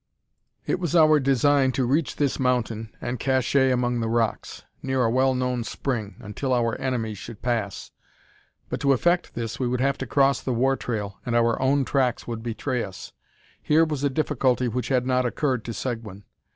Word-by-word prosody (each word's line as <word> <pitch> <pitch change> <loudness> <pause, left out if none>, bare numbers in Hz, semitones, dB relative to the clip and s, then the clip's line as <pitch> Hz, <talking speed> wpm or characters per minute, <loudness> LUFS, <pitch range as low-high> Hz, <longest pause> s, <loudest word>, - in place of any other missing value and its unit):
It - - 0
was 175 -2 -2
our 155 -2 +6
design 135 0 +3
to 130 - 0
reach 140 +5 0
this 140 -3 0
mountain, 115 -4 0
and 120 0 -3
"cacher" 130 +1 +2
among 125 -1 0
the 115 -1 -1
rocks, 115 -1 -1 0.2
near 130 -1 0
a 115 - +2
well 130 +1 +2
known 125 -1 -1
spring, 115 -4 -3
until 130 +6 -3
our 115 -1 +1
enemies 115 -6 -2
should 115 -2 -10
pass; 115 -5 -2 0.8
but - - -4
to 140 -1 +3
effect 175 +7 +1
this 115 -2 -4
we 130 - 0
would 125 0 -1
have 135 +1 +1
to 135 - -4
cross 140 +1 +3
the 130 - -2
war 135 +3 +2
trail, 105 -6 -4
and 120 - -2
our 115 0 +2
own 135 +1 +2
tracks 130 -3 0
would 115 -2 -5
betray 120 +2 -2
us. 95 -2 -9 0.5
Here 160 +2 +4
was 150 -3 -3
a 140 - +3
difficulty 130 -3 +1
which 125 +2 -2
had 125 -2 +1
not 130 0 +2
occurred 125 -1 -1
to 120 - -4
Seguin. 110 -5 -5
125 Hz, 190 wpm, -25 LUFS, 115-135 Hz, 0.8 s, our